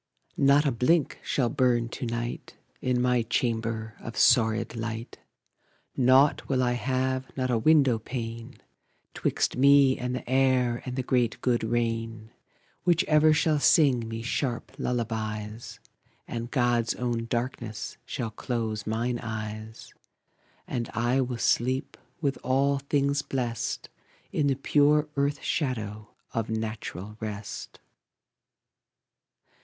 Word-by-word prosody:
Not 140 Hz, +2 st, +5 dB
a 140 Hz, -, +3 dB
blink 130 Hz, +6 st, +1 dB
shall 125 Hz, -4 st, 0 dB
burn 125 Hz, -4 st, +2 dB
to 120 Hz, -, -5 dB
night 120 Hz, +1 st, -4 dB, 0.2 s
In 125 Hz, -1 st, +1 dB
my 125 Hz, -1 st, +3 dB
chamber, 115 Hz, -1 st, -1 dB
of 115 Hz, -, -8 dB
sordid 115 Hz, -1 st, +3 dB
light; 115 Hz, 0 st, -5 dB, 0.8 s
Nought 130 Hz, +3 st, +4 dB
will 130 Hz, -2 st, +2 dB
I 125 Hz, -, +2 dB
have, 130 Hz, +1 st, -1 dB
not 130 Hz, -1 st, 0 dB
a 120 Hz, -, +2 dB
window 135 Hz, -3 st, +4 dB
pane, 115 Hz, -1 st, -6 dB, 0.6 s
'Twixt -, -, -1 dB
me 140 Hz, 0 st, +5 dB
and 125 Hz, 0 st, -2 dB
the -, -, -6 dB
air 130 Hz, -2 st, +2 dB
and 125 Hz, -, -3 dB
the 130 Hz, -, -1 dB
great 120 Hz, -2 st, +1 dB
good 120 Hz, -2 st, +1 dB
rain, 115 Hz, -1 st, -2 dB, 0.5 s
Which 175 Hz, -2 st, +3 dB
ever 155 Hz, 0 st, +4 dB
shall 155 Hz, 0 st, +2 dB
sing 135 Hz, -7 st, +4 dB
me 115 Hz, 0 st, -5 dB
sharp 120 Hz, 0 st, -2 dB
lullabies; 110 Hz, -2 st, -3 dB, 0.5 s
And 120 Hz, 0 st, -4 dB
God's 120 Hz, -2 st, +1 dB
own 120 Hz, -2 st, -2 dB
darkness 115 Hz, -2 st, -4 dB
shall 115 Hz, -4 st, -4 dB
close 110 Hz, -2 st, -3 dB
mine 120 Hz, +2 st, -1 dB
eyes; 110 Hz, 0 st, -6 dB, 0.7 s
And 120 Hz, -1 st, -3 dB
I 120 Hz, +3 st, +2 dB
will 125 Hz, -1 st, -2 dB
sleep, 130 Hz, +3 st, 0 dB, 0.3 s
with 140 Hz, -3 st, 0 dB
all 135 Hz, +2 st, +2 dB
things 140 Hz, 0 st, +1 dB
blest, 120 Hz, -5 st, -3 dB, 0.4 s
In 145 Hz, -, +1 dB
the 135 Hz, -, +2 dB
pure 150 Hz, +2 st, +3 dB
earth 140 Hz, 0 st, 0 dB
shadow 110 Hz, -7 st, -2 dB, 0.2 s
of 115 Hz, -1 st, -2 dB
natural 110 Hz, -2 st, -5 dB
rest. 105 Hz, -1 st, -6 dB
120 Hz, 125 wpm, -27 LUFS, 115-135 Hz, 0.8 s, Not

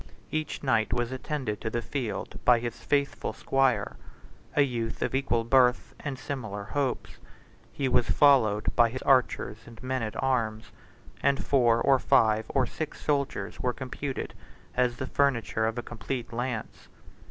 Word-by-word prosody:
Each 155 Hz, -1 st, -3 dB
knight 115 Hz, -5 st, +2 dB
was 120 Hz, 0 st, 0 dB
attended 130 Hz, -4 st, -3 dB
to 110 Hz, -, -2 dB
the 120 Hz, +1 st, -2 dB
field 120 Hz, -1 st, -4 dB
by 125 Hz, -1 st, +6 dB
his 120 Hz, -1 st, -4 dB
faithful 140 Hz, -1 st, -1 dB
squire, 135 Hz, -6 st, +1 dB, 0.6 s
a 145 Hz, -, +6 dB
youth 120 Hz, -4 st, -2 dB
of -, -, -2 dB
equal 130 Hz, -3 st, +1 dB
birth 125 Hz, +1 st, +3 dB
and 140 Hz, -3 st, -4 dB
similar 110 Hz, -8 st, -5 dB
hopes; 135 Hz, +4 st, -2 dB, 0.5 s
he 135 Hz, -, -1 dB
was 125 Hz, -2 st, +2 dB
followed 120 Hz, -8 st, +4 dB
by 120 Hz, -1 st, +5 dB
his 130 Hz, +3 st, -6 dB
archers 130 Hz, -5 st, +2 dB
and 115 Hz, -1 st, -12 dB
men 130 Hz, 0 st, -1 dB
at 110 Hz, -1 st, -4 dB
arms, 115 Hz, -5 st, -1 dB, 0.5 s
and 140 Hz, 0 st, +1 dB
four, 120 Hz, -4 st, +4 dB
or 135 Hz, +1 st, +4 dB
five, 110 Hz, -2 st, +3 dB
or 135 Hz, -2 st, +2 dB
six 155 Hz, +3 st, -6 dB
soldiers 140 Hz, -2 st, -1 dB
were 125 Hz, -, 0 dB
computed 130 Hz, +2 st, -5 dB, 0.4 s
as 125 Hz, -1 st, +1 dB
the 130 Hz, -, -3 dB
furniture 115 Hz, -6 st, +1 dB
of 115 Hz, +1 st, -3 dB
a 120 Hz, -, -3 dB
complete 120 Hz, +2 st, -5 dB
lance. 120 Hz, -2 st, -4 dB
125 Hz, 155 wpm, -28 LUFS, 115-135 Hz, 0.6 s, by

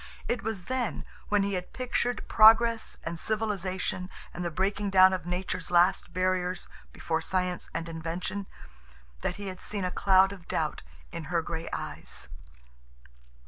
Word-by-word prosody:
It 240 Hz, -, 0 dB
was 210 Hz, -5 st, -4 dB
then, 255 Hz, -3 st, -2 dB, 0.2 s
when 205 Hz, -1 st, +3 dB
he 200 Hz, 0 st, -1 dB
had 180 Hz, -1 st, -4 dB
pictured 245 Hz, -1 st, -1 dB
progress 225 Hz, +1 st, +6 dB
and 165 Hz, 0 st, -4 dB
civilization 190 Hz, -4 st, -1 dB, 0.2 s
and 175 Hz, -, -4 dB
the 175 Hz, -, -1 dB
breaking 200 Hz, +4 st, 0 dB
down 190 Hz, -1 st, +7 dB
of 180 Hz, -2 st, -3 dB
nature's 180 Hz, 0 st, -2 dB
last 180 Hz, +2 st, +3 dB
barriers 185 Hz, 0 st, 0 dB, 0.2 s
before 160 Hz, -1 st, -2 dB
science 180 Hz, 0 st, -1 dB
and 165 Hz, 0 st, -4 dB
invention, 165 Hz, +4 st, -4 dB, 0.7 s
that 175 Hz, -, -2 dB
he 205 Hz, -, -7 dB
had 185 Hz, -1 st, -6 dB
seen 200 Hz, -3 st, -1 dB
a 180 Hz, -, -1 dB
cloud 190 Hz, 0 st, +5 dB
of 190 Hz, -4 st, -11 dB
doubt -, -, -1 dB, 0.3 s
in 160 Hz, -, -6 dB
her 170 Hz, +2 st, 0 dB
gray 165 Hz, 0 st, -4 dB
eyes. -, -, -5 dB
185 Hz, 150 wpm, -29 LUFS, 175-205 Hz, 0.7 s, down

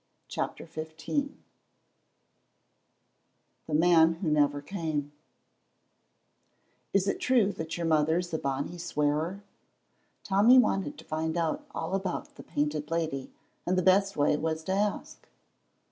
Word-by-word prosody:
CHAPTER -, -, -4 dB
XV 160 Hz, 0 st, -8 dB, 2.7 s
THE 155 Hz, -, -5 dB
MAN 165 Hz, 0 st, +5 dB
WHO 165 Hz, -2 st, -2 dB
NEVER 145 Hz, -1 st, +3 dB
CAME 155 Hz, -5 st, -3 dB, 1.8 s
"Is 195 Hz, 0 st, +2 dB
it -, -, 0 dB
true 235 Hz, -6 st, +3 dB
that 160 Hz, +1 st, -5 dB
your 170 Hz, -, -2 dB
mother's 165 Hz, +2 st, +1 dB
a 160 Hz, -, 0 dB
bonny 140 Hz, +5 st, -3 dB
swearer?" 160 Hz, +4 st, -1 dB, 0.8 s
Tommy 205 Hz, +6 st, +5 dB
wanted 195 Hz, -, +2 dB
to -, -, -13 dB
find 160 Hz, +1 st, -2 dB
out 165 Hz, -2 st, -1 dB
all 165 Hz, +3 st, -4 dB
about 195 Hz, -2 st, -3 dB
the -, -, -11 dB
Painted 150 Hz, +1 st, -2 dB
Lady, 160 Hz, -5 st, -2 dB, 0.4 s
and 185 Hz, +1 st, +2 dB
the 185 Hz, -, +2 dB
best 195 Hz, +1 st, +3 dB
way 145 Hz, +1 st, +3 dB
was 160 Hz, 0 st, -2 dB
to 190 Hz, -, -3 dB
ask. 205 Hz, +1 st, -2 dB
165 Hz, 125 wpm, -29 LUFS, 150-190 Hz, 2.7 s, MAN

